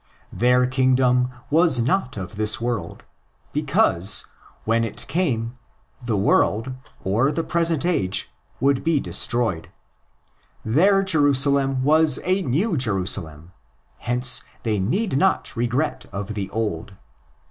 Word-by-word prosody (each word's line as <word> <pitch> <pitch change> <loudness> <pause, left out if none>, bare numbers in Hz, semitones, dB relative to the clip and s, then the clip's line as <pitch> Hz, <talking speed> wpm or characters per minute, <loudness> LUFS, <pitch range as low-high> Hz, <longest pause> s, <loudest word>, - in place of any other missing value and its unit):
Their 125 +1 +3
kingdom 130 -1 +2 0.2
was 160 -4 +3
not 130 - -1
of 95 -1 -7
this 110 +3 +2
world; 120 -3 -4 0.5
because, 90 +4 +1 0.4
when 115 +1 +1
it 115 - -5
came, 125 -7 -2 0.4
the 115 -4 -1
world—or 115 +3 0
the 165 - -2
present 165 -3 0
age—would 135 - -1
be 165 -3 +2
destroyed. 115 -11 -1 1.0
Their 195 - +3
Jerusalem 140 -5 +2
was 155 +2 +3
a 185 +2 +1
New 165 - 0
Jerusalem; 90 - -1 0.5
hence 125 +1 +2 0.2
they 110 -3 -1
need 155 - -1
not 190 -5 0
regret 125 +6 -2
the 100 0 -5
old. 105 -4 -4
125 Hz, 105 wpm, -22 LUFS, 110-150 Hz, 1.0 s, Their